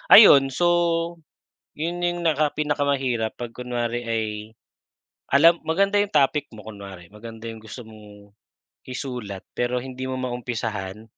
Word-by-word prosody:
Ayun, 140 -11 +9
so 170 +3 +1 0.6
'yon, 170 +3 -3
yung 175 0 -1
naka 155 -2 +1
pinakamahirap 140 -6 0
pag 120 -1 -6
kunwari 120 -1 -3
ay 115 -1 0 1.1
alam 165 +5 +7
maganda 195 +5 +2
yung 205 +1 +1
topic 145 -1 +3
mo 110 - -10
kunwari 100 -4 -10
maganda 115 +2 -9
yung 115 - -8
gusto 110 +3 -9
mong 105 -2 -14 0.6
isulat, 125 -7 -5
pero 120 +1 -1
hindi 130 +1 -5
mo 130 - -3
maumpisahan. 115 -5 -4
125 Hz, 130 wpm, -24 LUFS, 110-155 Hz, 1.1 s, Ayun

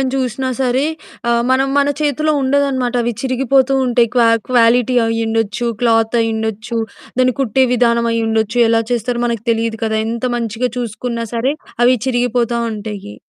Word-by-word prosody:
అని 260 -1 0
చూసినా 260 0 -2
సరే 260 +1 +1 0.5
ఆహ్, 235 0 +2
మనం 265 +1 +2
మన 285 0 +3
చేతిలో 305 +1 +1
ఉండదనమాట. 265 -2 0
అవి 240 +1 -1
చిరిగిపోతూ 265 +1 +2
ఉంటాయి, 240 -2 +2
క్వా 235 -2 +4 0.2
క్వాలిటీ 245 0 +3
అయ్యుండొచ్చు, 225 0 -1
క్లాతయ్యుండొచ్చు, 225 -1 0 0.4
దాన్ని 255 -1 +3
కుట్టే 260 0 +2
విధానం 235 -1 +2
అయ్యుండొచ్చు, 225 0 0
ఎలా 225 0 +3
చేస్తారో 240 +1 -1
మనకి 230 -2 -3
తెలిదు 225 -1 -2
కదా! 220 0 0
ఎంత 235 +2 -4
మంచిగా 235 +1 -2
చూసుకున్నా 235 0 -4
సరే 255 +4 +1 0.3
అవి 250 +1 +5
చిరిగిపోతా 245 -1 0
ఉంటాయి. 205 - -7
235 Hz, 140 wpm, -17 LUFS, 225-255 Hz, 0.5 s, అవి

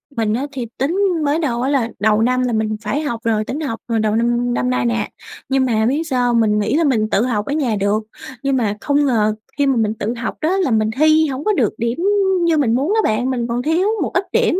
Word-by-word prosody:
Mình 220 -2 0
á 270 +5 -2
thì 255 -4 -4
tính 310 +8 -1 0.3
mới 295 +3 +1
đầu 245 -7 -1
á 265 - 0
là 265 -5 +1
đầu 215 +1 +2
năm 255 +2 +2
là 245 -2 0
mình 215 -1 -1
phải 250 +8 -2
học 235 -7 -3
rồi, 220 -2 +1
tính 285 - -4
học 270 -8 -4
hồi 230 -1 0
đầu 215 0 +1
năm 240 +1 +1
năm 125 0 0
nay 125 -1 0
nè. 110 -2 -1 0.4
Nhưng 265 -1 +2
mà 220 -3 +1
biết 285 +7 +1
sao 250 -2 +1
hông? 230 - +3
Mình 210 -1 +2
nghĩ 210 - 0
là 335 - +2
mình 220 -7 +1
tự 200 - +2
học 215 -4 -1
ở 285 - -3
nhà 260 -8 0
được, 205 +2 0 0.4
nhưng 275 -1 +1
mà 210 -4 0
không 285 0 +1
ngờ 215 -4 +1 0.2
khi 285 - +2
mà 270 - +2
mình 220 -2 +1
tự 225 +2 -3
học 235 - -4
đó 350 +5 +1
là 360 -10 +1
mình 215 -1 +2
thi 310 +1 +4
không 265 +3 -5
có 425 - +2
được 245 - +1
điểm 235 +1 -2 0.5
như 325 -2 +2
mình 240 -5 +2
muốn 295 +11 0
á 440 - +3
bạn. 245 +4 0
Mình 240 -2 -1
còn 240 +1 -2
thiếu 330 +8 +1
một - - -1
ít 380 - +1
điểm 370 - +2
240 Hz, 265 wpm, -19 LUFS, 220-285 Hz, 0.5 s, thi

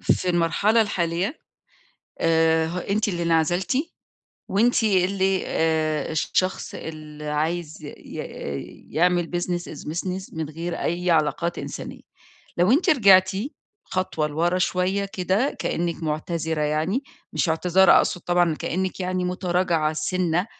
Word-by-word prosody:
في 185 - +1
المرحلة 180 +6 +3
الحالية 185 - -1 0.8
آآ، 160 0 +3
ه 175 - -4
أنتِ 205 +4 0
اللي 175 -3 -2
انعزلتِ، 170 +5 +1 0.7
وأنتِ 230 +4 +3
اللي 190 -1 +2
آآ، 155 -2 0
الشخص 185 +4 -1
اللي 155 -1 -8
عايز 155 +1 -2
ي 145 - -7
ي 70 -1 -7
يعمل 175 0 +2
business 175 0 -1
is 150 - -9
business 185 +2 -4
من 160 -2 -3
غير 165 +3 -4
أي 175 +1 -1
علاقات 165 +2 +1
إنسانية. - - -7 0.6
لو 180 +7 +4
أنتِ 350 +6 +3
رجعتِ 195 - +6 0.5
خطوة 185 -4 -1
لورا 170 +4 0
شوية 185 +2 0
كده 195 +7 0
كأنِك 170 0 -2
معتذرة 160 0 -2
يعني، 155 - 0 0.3
مش - - 0
اعتذار 180 +3 +4
أقصد 180 - +2
طبعًا، 175 -2 +2
كأنك 185 +5 -3
يعني 185 0 -1
متراجعة 180 -3 0
سِنّة 180 +3 0
175 Hz, 125 wpm, -24 LUFS, 160-185 Hz, 0.8 s, رجعتِ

